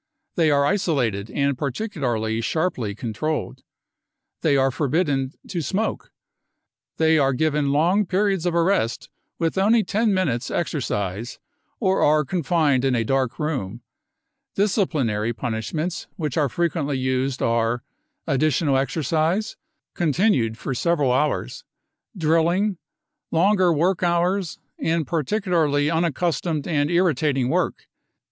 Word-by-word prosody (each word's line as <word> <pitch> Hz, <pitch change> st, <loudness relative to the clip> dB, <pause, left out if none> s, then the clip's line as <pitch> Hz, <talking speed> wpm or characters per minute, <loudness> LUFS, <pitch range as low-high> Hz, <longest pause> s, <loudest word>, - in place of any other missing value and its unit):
They 165 Hz, -4 st, +2 dB
are 140 Hz, -1 st, +3 dB
isolated 130 Hz, -, 0 dB
and 140 Hz, -1 st, 0 dB
particularly 125 Hz, -, -2 dB
sharply 125 Hz, -, -1 dB
controlled. 125 Hz, +8 st, -3 dB, 0.8 s
They 145 Hz, -3 st, +3 dB
are 135 Hz, 0 st, +3 dB
forbidden 140 Hz, -1 st, 0 dB, 0.2 s
to 175 Hz, -3 st, -2 dB
smoke. 195 Hz, +9 st, -2 dB, 0.9 s
They 160 Hz, 0 st, +4 dB
are 135 Hz, -1 st, +2 dB
given 145 Hz, 0 st, +1 dB
long 175 Hz, +8 st, +2 dB
periods 190 Hz, -2 st, +1 dB
of 170 Hz, -, 0 dB
arrest 170 Hz, -, +1 dB, 0.3 s
with 165 Hz, +2 st, 0 dB
only 220 Hz, +3 st, +4 dB
ten 215 Hz, +3 st, +1 dB
minutes 145 Hz, -11 st, 0 dB
exercise, 115 Hz, -, -3 dB, 0.4 s
or 190 Hz, -4 st, +1 dB
are 150 Hz, 0 st, +3 dB
confined 155 Hz, -5 st, +1 dB
in 135 Hz, -2 st, +2 dB
a 115 Hz, -, +1 dB
dark 135 Hz, +1 st, 0 dB
room. 125 Hz, -8 st, -3 dB, 0.7 s
Disciplinary 145 Hz, -, 0 dB
punishments 120 Hz, +10 st, -3 dB
which 150 Hz, -6 st, -3 dB
are 145 Hz, -3 st, +2 dB
frequently 150 Hz, -2 st, -1 dB
used 130 Hz, 0 st, -1 dB
art: 115 Hz, +1 st, +1 dB, 0.4 s
additional 140 Hz, 0 st, +2 dB
exercise, 160 Hz, -, 0 dB, 0.4 s
con 165 Hz, -4 st, 0 dB
tinued 130 Hz, -, +2 dB
for 135 Hz, -, -4 dB
several 145 Hz, -1 st, +1 dB
hours, 150 Hz, +4 st, -1 dB, 0.5 s
drilling, 170 Hz, +4 st, +1 dB, 0.5 s
longer 185 Hz, +1 st, +3 dB
work 170 Hz, +4 st, +1 dB
hours, 175 Hz, +1 st, 0 dB, 0.2 s
and 165 Hz, -1 st, 0 dB
particularly 160 Hz, -2 st, 0 dB
unaccustomed 165 Hz, -1 st, -1 dB
and 145 Hz, -3 st, +1 dB
irritating 150 Hz, -7 st, +1 dB
wo^k. -, -, +1 dB
155 Hz, 115 wpm, -23 LUFS, 130-175 Hz, 0.9 s, They